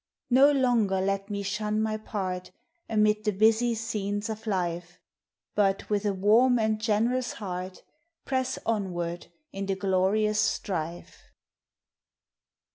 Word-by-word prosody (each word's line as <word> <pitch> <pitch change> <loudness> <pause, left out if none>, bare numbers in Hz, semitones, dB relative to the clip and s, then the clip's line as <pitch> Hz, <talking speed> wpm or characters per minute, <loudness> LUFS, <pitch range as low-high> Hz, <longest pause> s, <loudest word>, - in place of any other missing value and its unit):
]No 270 +4 +7
longer 240 -8 +2
let 195 +1 -1
me 200 -1 -3
shun 210 +1 -1
my 220 0 0
part 190 -4 -4 0.4
Amid 215 -1 +2
the 215 - +1
busy 220 +4 +3
scenes 210 -1 -3
of 220 +1 -8
life, 175 -3 -2 0.5
But 195 0 +1
with 210 0 +1
a 200 - +1
warm 225 +6 +4
and 220 -1 0
generous 235 +3 +1
heart 185 -3 -6 0.4
Press 260 -1 -1
onward 175 -6 -2 0.2
in 195 0 -5
the 195 - 0
glorious 200 +2 +1
strife. 175 -5 -3
210 Hz, 120 wpm, -27 LUFS, 190-220 Hz, 0.5 s, No